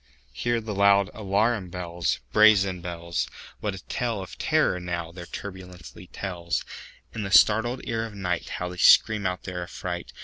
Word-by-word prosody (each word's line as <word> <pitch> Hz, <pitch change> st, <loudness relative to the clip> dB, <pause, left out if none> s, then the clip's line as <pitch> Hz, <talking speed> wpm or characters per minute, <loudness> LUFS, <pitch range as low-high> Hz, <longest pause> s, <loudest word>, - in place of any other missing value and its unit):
Hear 120 Hz, -, 0 dB
the 110 Hz, -1 st, -5 dB
loud 100 Hz, 0 st, +4 dB
alarum 105 Hz, -1 st, 0 dB
bells, 85 Hz, -1 st, -2 dB
Brazen 100 Hz, -4 st, +5 dB
bells! 85 Hz, -1 st, -3 dB, 0.3 s
What 105 Hz, -2 st, -3 dB
a 95 Hz, -, -11 dB
tale 120 Hz, -4 st, -2 dB
of 95 Hz, -, -8 dB
terror, 155 Hz, -12 st, +2 dB
now, 85 Hz, -2 st, -4 dB
their 85 Hz, 0 st, -9 dB
turbulency 90 Hz, -2 st, -9 dB
tells! 85 Hz, -3 st, -4 dB, 0.5 s
In 115 Hz, -, -4 dB
the 100 Hz, -, -3 dB
startled 110 Hz, +5 st, +4 dB
ear 115 Hz, -1 st, -2 dB
of 110 Hz, -, -12 dB
nightHow 90 Hz, -2 st, -3 dB
they 90 Hz, -, -9 dB
scream 105 Hz, +3 st, +5 dB
out 90 Hz, 0 st, -4 dB
their 90 Hz, -2 st, -5 dB
affright! 85 Hz, -, -5 dB
95 Hz, 160 wpm, -26 LUFS, 90-105 Hz, 0.5 s, Brazen